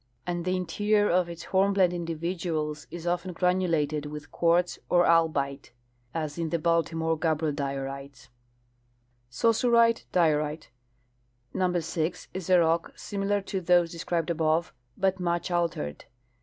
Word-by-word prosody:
67 175 - -2
and 175 0 -4
the 185 0 +1
interior 205 +4 +1
of 180 0 +2
its 170 -1 -8
hornblende 190 -1 +3
individuals 165 -2 -3
is 170 +1 -8
often 175 +1 -1
granulated 165 -5 +1
with 150 0 -8
quartz 170 +1 +2
or 175 0 +4
albite, 145 -6 +1 0.4
as 155 0 -4
in 165 -1 -1
the 170 - 0
Baltimore 165 0 +1
gabbro 155 -1 0
diorites/'^' 135 -2 -5 1.0
Saussurite 230 - +3
diorite. 155 -3 +1 0.5
— 120 0 -43
Number 180 -1 +1
6 165 +2 -3
is 185 -1 -5
a 185 - +6
rock 165 0 +1
similar 200 0 -2
to 195 -1 -4
those 175 -1 +3
de 170 - -8
scribed 170 -1 -1
abo 160 0 +1 0.3
i 195 - 0
e, - - +5
]3ut 190 - -20
much 175 0 -1
altered. 165 - -2
170 Hz, 145 wpm, -27 LUFS, 155-180 Hz, 1.0 s, a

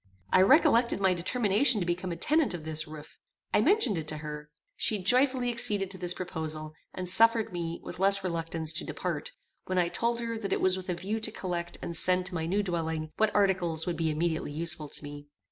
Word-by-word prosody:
I 185 - +7
recollected 245 - +5
my 190 -2 +3
determination 210 +6 +2
to 180 - -1
become 180 +1 -2
a - - -3
tenant 290 - +2
of 165 - -8
this 155 0 -3
roof. 155 -1 -11 0.3
I - - +4
mentioned 260 - +3
it 155 - -7
to 155 - -1
her. 150 -1 -7 0.3
She 215 - 0
joyfully 250 +5 +3
acceded 205 -5 +1
to 190 - -7
this 180 0 +1
proposal, 155 -3 -4 0.2
and 185 0 -5
suffered 225 +2 +3
me, 170 -1 -4
with - - -8
less 195 0 +3
reluctance, 165 -2 -3
to 160 - -1
depart, - - -4 0.3
when 185 - -2
I 175 -1 +2
told 235 +5 -1
her 230 -1 -3
that 200 -3 -2
it - - 0
was 185 0 +3
with 185 0 -7
a 180 - 0
view 200 +5 -3
to 220 0 -1
collect 175 -4 -4
and 170 - -4
send 180 +2 +2
to 180 - -2
my 160 -2 -2
new 200 +4 +1
dwelling 160 -3 -3
what 220 0 +3
articles 180 -5 +1
would 175 - -2
be 165 -1 0
immediately 160 0 -1
useful 155 -1 -2
to - - -2
me. 145 0 -9
180 Hz, 215 wpm, -29 LUFS, 160-210 Hz, 0.3 s, I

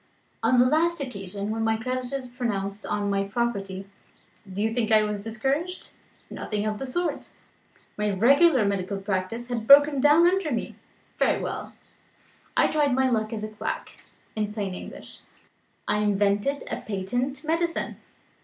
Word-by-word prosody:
On 255 - +3
the 245 - +6
last 330 +5 +2
occasion 200 -5 -5
when 225 0 -1
my 225 0 +2
creditors 255 +2 -3
pounced 205 -5 -3
on 205 -1 -1
my 195 0 +1
property, 195 -3 -3 0.6
do 190 - -6
you 225 0 0
think 225 -2 0
I 215 -1 +6
was 210 -1 -3
discouraged? 275 - -2 0.4
Nothing 210 -1 -3
of 215 -1 -2
the 270 - -4
sort! 325 +2 -2 0.7
My 210 0 +1
regular 260 - +5
medical 200 0 -1
practice 195 +4 -3
had 230 -2 -3
broken 285 0 +7
down 295 +4 +6
under 365 -2 +2
me. 235 - -2 0.5
Very - - +3
well - - -5 0.8
I - - +6
tried 290 -4 +2
my 260 0 +2
luck 220 -2 0
as 215 -2 -4
a 215 - -3
quack. 215 - -6 0.3
In 210 -1 -1
plain 205 -3 -3
English, - - -9 0.7
I 210 - +1
invented 205 +6 +1
a - - -1
patent 245 +9 -3
medicine. 335 +2 -1
225 Hz, 155 wpm, -26 LUFS, 205-275 Hz, 0.8 s, broken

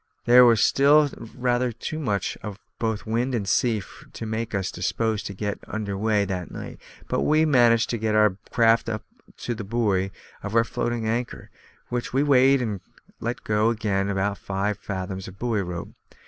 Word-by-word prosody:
There 125 +1 +8
was 115 -3 +5
still 145 +1 +5 0.2
rather 125 0 +1
too 120 +7 -5
much 105 - -1
of 105 -2 -6 0.2
both 110 -2 -2
wind 120 +3 0
and 100 -4 -2
sea 110 0 +1 0.3
to 115 - -6
make 110 0 -3
us 95 -2 -1
disposed 110 +4 -1
to 100 - -7
get 105 +1 -3
under 105 -2 -4
way 105 0 +1
that 90 -2 -4
night, - - -8 0.3
but - - 0
we 155 +1 +3
managed 120 -5 +4
to 120 - -2
get 110 0 0
the 105 -3 +4
craft 115 -1 +3
up 110 -1 -3 0.4
to 120 - -2
the 110 -1 -6
buoy 100 -3 0 0.3
of 105 +2 -5
our 115 - +5
floating 115 -1 -2
anchor, 120 +2 -3 0.4
which 120 0 -3
we 135 +2 +3
weighed 135 -2 +4
and 105 -5 -3 0.4
let 120 +2 -4
go 105 +1 +2
again 105 -4 0
with 100 0 -1
five 100 +1 -2
fathoms 95 -1 -5
of 95 +1 -11
buoy 115 -2 0
rope. 90 -2 -5
110 Hz, 180 wpm, -24 LUFS, 100-120 Hz, 0.4 s, There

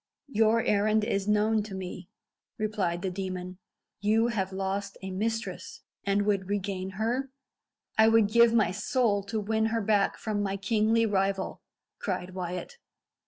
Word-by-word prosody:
"Your 225 0 +3
errand 210 +1 +2
is 200 -2 -1
known 210 +1 +3
to 205 -2 -7
me," 185 -1 -7 0.5
replied 200 -5 -1
the 190 - -1
demon. 185 -1 -5 0.4
"You 220 +3 +2
have 195 -5 -1
lost 195 +1 -3
a 190 - -4
mistress, 225 +4 -3 0.2
and 200 +1 +2
would 200 -2 0
regain 195 -2 -2
her?" 245 +5 -1 0.7
"I 220 - +8
would 225 -2 +5
give 235 +2 +5
my 225 -5 +3
soul 210 +1 +1
to 220 +1 -2
win 220 +1 +1
her 225 0 0
back 205 -1 +2
from 210 -2 -2
my 195 -1 -1
kingly 220 +3 +2
rival," 195 -2 0 0.4
cried 185 -1 -3
Wyat. 180 - -5
205 Hz, 150 wpm, -28 LUFS, 190-220 Hz, 0.7 s, I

